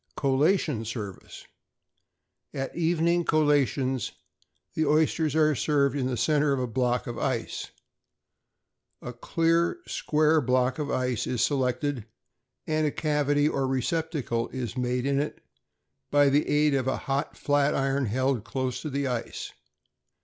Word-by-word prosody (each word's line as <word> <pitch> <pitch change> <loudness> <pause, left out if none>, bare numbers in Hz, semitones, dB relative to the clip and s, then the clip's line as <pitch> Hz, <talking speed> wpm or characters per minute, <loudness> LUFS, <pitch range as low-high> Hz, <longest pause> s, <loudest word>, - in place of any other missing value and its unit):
=Collation 140 - +1
Service.= 110 -4 -7 1.1
At 135 -1 -4
evening 170 +1 +2
collations, 140 -5 +1 0.6
the 160 - 0
oysters 155 0 +2
are 155 -1 +4
served 140 +3 +1
in 130 -3 0
the 125 -2 -2
centre 150 +4 +2
of 135 - -1
a 125 - 0
block 125 +1 0
of 120 - -5
ice. 130 -4 -2 1.3
A 125 - -6
clear, 165 - +1
square 155 +1 +2
block 130 +1 +1
of 150 -1 -2
ice 125 -3 -1
is 125 -2 0
selected, 130 -3 -1 0.6
and 155 0 +1
a - - 0
cavity 145 -1 +1
or 135 -3 0
receptacle 135 -3 -1
is 125 -2 -5
made 125 0 -1
in 140 0 +1
it 150 - -3 0.7
by 145 -1 +4
the 145 +2 +2
aid 150 0 +3
of 130 -2 0
a 130 - 0
hot 140 +1 -2
flat 145 0 +2
iron 135 -1 0
held 130 +1 0
close 130 0 -3
to 155 - -4
the 140 0 -2
ice. 125 -3 -4
140 Hz, 140 wpm, -27 LUFS, 125-150 Hz, 1.3 s, are